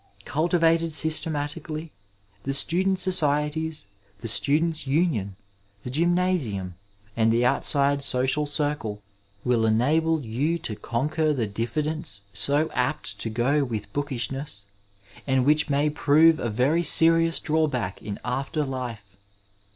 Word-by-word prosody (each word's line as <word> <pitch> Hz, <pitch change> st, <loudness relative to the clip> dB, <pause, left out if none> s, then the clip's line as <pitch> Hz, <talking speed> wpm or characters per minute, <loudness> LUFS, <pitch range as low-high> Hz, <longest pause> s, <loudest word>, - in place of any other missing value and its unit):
Culti 170 Hz, +4 st, 0 dB
vated 165 Hz, -1 st, +2 dB
systematically, 155 Hz, 0 st, 0 dB, 0.5 s
the 135 Hz, +4 st, -2 dB
student 185 Hz, +6 st, +2 dB
societies, 155 Hz, -, 0 dB, 0.3 s
the 115 Hz, -, -7 dB
students' 155 Hz, +6 st, +1 dB
union, 135 Hz, -, 0 dB, 0.5 s
the 125 Hz, -, -6 dB
gymnasium, 160 Hz, -, 0 dB, 0.4 s
and 115 Hz, -1 st, +2 dB
the 120 Hz, +2 st, +2 dB
outside 140 Hz, +2 st, +1 dB
social 135 Hz, +2 st, 0 dB
drele 145 Hz, -8 st, -2 dB, 0.4 s
will 120 Hz, -2 st, +1 dB
enable 155 Hz, +9 st, +2 dB
you 140 Hz, +7 st, -2 dB
to 110 Hz, -9 st, -5 dB
conquer 150 Hz, +8 st, -1 dB
the 120 Hz, -4 st, -1 dB
diffidence 120 Hz, +2 st, -3 dB
so 145 Hz, +10 st, 0 dB
apt 125 Hz, -5 st, -2 dB
to 115 Hz, -, -2 dB
go 125 Hz, +6 st, +1 dB
with 115 Hz, -6 st, -5 dB
boddshness 135 Hz, -5 st, -4 dB, 0.6 s
and 130 Hz, -2 st, +2 dB
which 150 Hz, +2 st, +3 dB
may 145 Hz, +1 st, +1 dB
prove 155 Hz, +2 st, +4 dB
a 120 Hz, -, -2 dB
very 130 Hz, +10 st, +1 dB
serious 165 Hz, 0 st, +5 dB
draw 155 Hz, 0 st, +1 dB
back 120 Hz, -10 st, -4 dB
in 105 Hz, -, -6 dB
after 135 Hz, +4 st, -2 dB
life. 120 Hz, -7 st, -6 dB
145 Hz, 125 wpm, -25 LUFS, 120-160 Hz, 0.6 s, serious